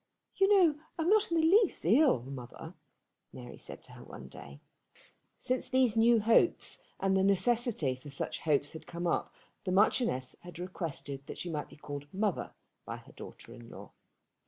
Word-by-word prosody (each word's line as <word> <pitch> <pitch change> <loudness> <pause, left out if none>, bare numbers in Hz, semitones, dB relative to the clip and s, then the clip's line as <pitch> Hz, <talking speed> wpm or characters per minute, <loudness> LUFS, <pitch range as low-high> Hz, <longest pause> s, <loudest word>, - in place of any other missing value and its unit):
"You 390 - +4
know 345 -7 +5 0.2
I'm 330 +1 0
not 435 0 +4
the 335 - 0
least 340 - +3
ill, 230 - +4
mother," 125 -2 -9 0.6
Mary 125 -1 -10
said - - -9
to - - -13
her - - -12
one - - -11
day. 70 0 -12 0.8
Since 255 0 -2
these 255 -3 +3
new 230 +1 +5
hopes 230 - +3 0.2
and 195 0 +1
the 190 - +3
necessity 200 - +1
for 130 +3 -11
such 135 - -3
hopes 145 -2 0
had 160 -1 -10
come 170 +1 -5
up 170 - 0 0.3
the 185 - -2
Marchioness 190 - +2
had 175 -1 -11
requested 160 -6 -6
that - - -7
she 175 - -4
might 150 -2 -4
be - - -15
called 145 -1 -8
mother 200 -1 -2 0.3
by - - -6
her - - -16
daughter 115 - -11
in 120 -1 -12
law. - - -11
185 Hz, 175 wpm, -31 LUFS, -, 0.8 s, know